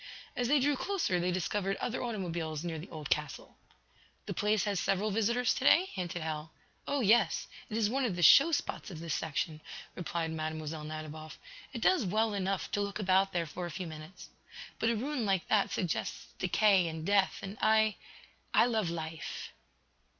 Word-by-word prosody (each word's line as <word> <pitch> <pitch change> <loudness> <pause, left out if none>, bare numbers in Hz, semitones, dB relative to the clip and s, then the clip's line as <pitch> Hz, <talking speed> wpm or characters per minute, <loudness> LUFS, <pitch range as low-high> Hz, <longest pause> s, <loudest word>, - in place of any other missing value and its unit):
As 245 - 0
they 290 +3 +4
drew 285 +2 +2
closer 335 - 0
they 180 +1 0
discovered 195 +2 -1
other 245 - -3
automobiles 170 -9 -3
near 165 -2 -3
the 165 - -9
old 155 -3 -7
castle. 150 -2 -2 0.7
"The - - -4
place 210 0 +1
has 200 -3 0
several 200 +2 0
visitors 225 +4 +2
to - - -4
day?" 360 +7 +5
hinted 175 -3 -4
Hal. 155 0 -4 0.4
"Oh, 285 -1 0
yes; 220 0 +3 0.2
it 215 - -2
is 220 -2 +3
one 265 +5 0
of 220 -8 0
the 175 - -1
show 280 - +8
spots 300 - -2
of 170 -5 -8
this 165 -2 -3
section," 155 0 -2 0.3
replied 165 -1 -3
Mlle. 155 0 -3 0.3
Nadiboff. 155 0 -7 0.3
"It - - -6
does 370 -9 +4
well 215 +3 +1
enough 195 -1 -2
to 205 - 0
look 200 0 -3
about 195 -1 +3
there 170 -2 0
for 175 +3 -5
a - - -6
few 180 +3 -5
minutes. 155 +2 -10 0.5
But 225 - +2
a 230 - +2
ruin 260 +3 -2
like 195 -4 0
that 210 -2 +3
suggests 175 -4 -3
death 185 - -2
and 170 -6 +4
decay, 205 - +2 0.3
and 195 +2 -6
I 220 -1 +4 0.6
I - - +7
love 220 -7 0
life." 160 -1 -5
190 Hz, 185 wpm, -31 LUFS, 165-220 Hz, 0.7 s, show